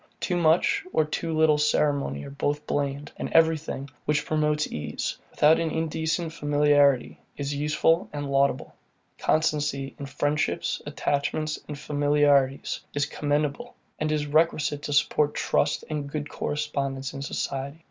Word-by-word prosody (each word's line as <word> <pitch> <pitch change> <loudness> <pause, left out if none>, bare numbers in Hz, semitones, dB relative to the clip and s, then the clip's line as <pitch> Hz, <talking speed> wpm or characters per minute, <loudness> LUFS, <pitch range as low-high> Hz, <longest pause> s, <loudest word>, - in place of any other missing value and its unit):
Too 180 - -1
much 165 0 +3
or 155 - +2
too 165 +2 -3
little 155 -1 +4
ceremony 145 - +1
are - - -8
both 145 +1 -2
blamed, 140 0 -2
and - - -4
everything, 160 -4 +2 0.2
which 150 0 +1
promotes 150 -1 +1
ease, 75 0 -4
without 155 +2 +4
an 165 -1 0
indecent 160 +1 -2
familiarity, 145 -3 +3 0.2
is 140 0 -2
useful 150 +3 +1
and 145 -1 -4
laudable. 135 -2 +1 0.5
Constancy 150 -3 0
in 140 - -5
friendships, 145 +2 -1
attachments, 155 +2 -1
and 150 - -6
familiarities, 145 -2 +2 0.2
is 145 0 +2
commendable, 145 0 -2 0.2
and 155 0 0
is 150 -1 0
requisite 150 -1 +1
to 145 0 -3
support 150 0 +2
trust 145 - +1
and 150 -2 -4
good 150 -1 -4
correspondence 140 -2 -3
in 135 - -6
society. 140 +1 -4
145 Hz, 135 wpm, -26 LUFS, 140-155 Hz, 0.5 s, little